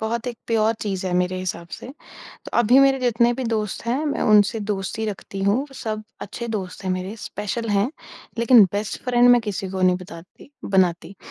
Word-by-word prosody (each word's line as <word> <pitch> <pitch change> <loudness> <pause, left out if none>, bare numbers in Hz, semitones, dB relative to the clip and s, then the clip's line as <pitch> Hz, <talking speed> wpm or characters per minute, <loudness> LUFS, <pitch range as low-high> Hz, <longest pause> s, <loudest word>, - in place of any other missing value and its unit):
बहुत 225 +2 -3
एक 240 -2 -4
प्योर 225 -1 +2
चीज़ 190 -3 -3
है 180 - -2
मेरे 180 +1 0
हिसाब 170 -2 -5
से। - - -8 0.4
तो - - -14
अभी 240 +3 +5
मेरे 270 -1 +4
जितने 240 -1 +2
भी 260 +1 -4
दोस्त 215 -2 -3
हैं, 265 +6 -1
मैं 290 - -2
उनसे 210 +1 +4
दोस्ती 205 +1 -3
रखती 195 -1 -6
हूँ। 225 +8 +1
सब 215 -3 -5 0.2
अच्छे 235 -1 -6
दोस्त 195 -4 -5
हैं 185 - -1
मेरे, 185 +4 -4
स्पेशल 215 +3 -4
हैं, 205 +3 +2 0.5
लेकिन 235 -1 +7
बेस्ट 205 0 -3
फ्रेंड 245 -1 +4
मैं 245 - +7
किसी 200 -2 -4
को 190 0 -4
नहीं 180 0 +4
बताती 180 +6 -13 0.2
बनाती, 185 -1 +1
215 Hz, 190 wpm, -22 LUFS, 190-235 Hz, 0.5 s, लेकिन